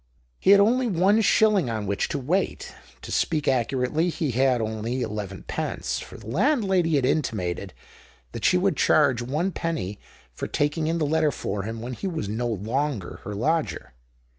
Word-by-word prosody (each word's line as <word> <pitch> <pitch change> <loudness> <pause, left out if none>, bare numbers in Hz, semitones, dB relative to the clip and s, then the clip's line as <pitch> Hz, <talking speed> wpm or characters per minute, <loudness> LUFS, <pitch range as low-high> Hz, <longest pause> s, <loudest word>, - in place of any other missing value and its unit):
He - - +1
had 200 0 +8
only 240 +5 +3
one 200 +2 +3
shilling 210 - +3
on 110 -2 -3
which 100 0 -1
to 150 - -2
wait; 160 +9 -1 0.3
to - - -7
speak 155 -3 0
accurately, 130 +6 +1
he 160 -4 -2
had 130 +1 +2
only 110 +3 -2
elevenpence, 105 -3 -4
for - - -10
the 110 - -14
landlady 190 - +2
had 135 -3 +2
intimated 105 - -1 0.6
that - - -7
she 180 - +4
would 190 +1 +1
charge 135 -6 +3
one 150 +10 -1
penny 160 - -3 0.3
for - - -5
taking 150 +2 0
in 165 +1 0
the 160 - 0
letter 155 +1 +2
for 105 -6 -3
him 110 +3 -5
when 125 +2 -5
he 195 - -4
was 165 - -3
no 115 +4 -2
longer 115 +1 -2
her 105 - -5
lodger. 135 - -1
140 Hz, 170 wpm, -25 LUFS, 110-170 Hz, 0.6 s, had